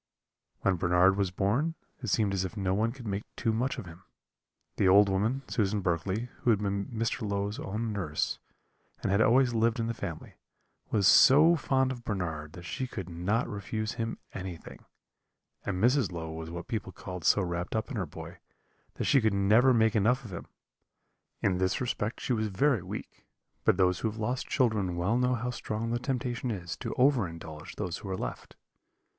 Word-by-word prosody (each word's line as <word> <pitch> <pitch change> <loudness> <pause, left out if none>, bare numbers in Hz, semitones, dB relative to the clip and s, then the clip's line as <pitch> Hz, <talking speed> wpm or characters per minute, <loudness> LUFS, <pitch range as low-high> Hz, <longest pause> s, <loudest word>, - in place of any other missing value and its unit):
"When 95 -2 +2
Bernard 90 +2 +4
was 100 -2 +1
born, 115 - 0 0.3
it 120 - -5
seemed 105 0 +2
as 95 -1 0
if 95 +4 -5
no 95 -2 0
one 110 +4 +1
could 125 -1 -11
make 100 -1 -2
too 115 -2 0
much 125 +4 -1
of - - -6
him. 85 0 -12 0.8
The - - +3
old 100 +2 +7
woman, 110 +8 0
Susan 105 -2 0
Berkley, 95 +6 -1
who - - 0
had 110 - +5
been 100 -1 -2
Mr. 115 +1 -2
Low's 100 0 -2
own 110 +3 -3
nurse, 80 -7 -2 0.6
and - - 0
had 100 +2 +3
always 120 +2 +4
lived 115 +1 +2
in 115 - 0
the 115 - -1
family, - - -7 0.5
was 100 -3 +3
so 150 - +7
fond 130 -3 +1
of 120 -2 -7
Bernard 80 -8 -3
that 90 - -10
she 130 +7 -3
could 95 -7 -6
not 90 +7 0
refuse 110 +1 -3
him 115 -2 -3 0.2
anything; 90 -3 -8 0.8
and 95 -3 -1
Mrs. 120 -1 +3
Low 80 -2 -5
was 80 0 -6
what 85 +1 -7
people 110 -4 -3
call 90 -1 -7
so 100 +4 +4
wrapped 85 +2 -3
up 110 +6 -2
in - - -4
her 90 -5 -2
boy, 80 +4 -10 0.6
that - - -3
she 135 - +4
could 110 -2 +2
never 110 +7 +5
make 110 -2 +3
enough 120 +5 +2
of 100 - -8
him. 85 - -7 1.0
In 95 -2 +2
this 95 0 +1
respect 115 -3 -2
she 130 - -1
was 110 -2 0
very 115 +3 +2
weak, 95 +4 -8 0.4
but - - +3
those 90 -1 +3
who 110 - 0
have 110 - -8
lost 125 +4 -2
children 110 - +1
well 90 +6 +1
know 125 +1 +2
how 125 +1 -2
strong 115 -1 -3
the 120 - 0
temptation 125 -1 -2
is 90 -6 -4
to - - -5
over 130 -6 +3
indulge 80 0 -9
those 85 -2 -3
who 100 - -8
are 95 - -2
left. - - -6
105 Hz, 195 wpm, -29 LUFS, 95-120 Hz, 1.0 s, old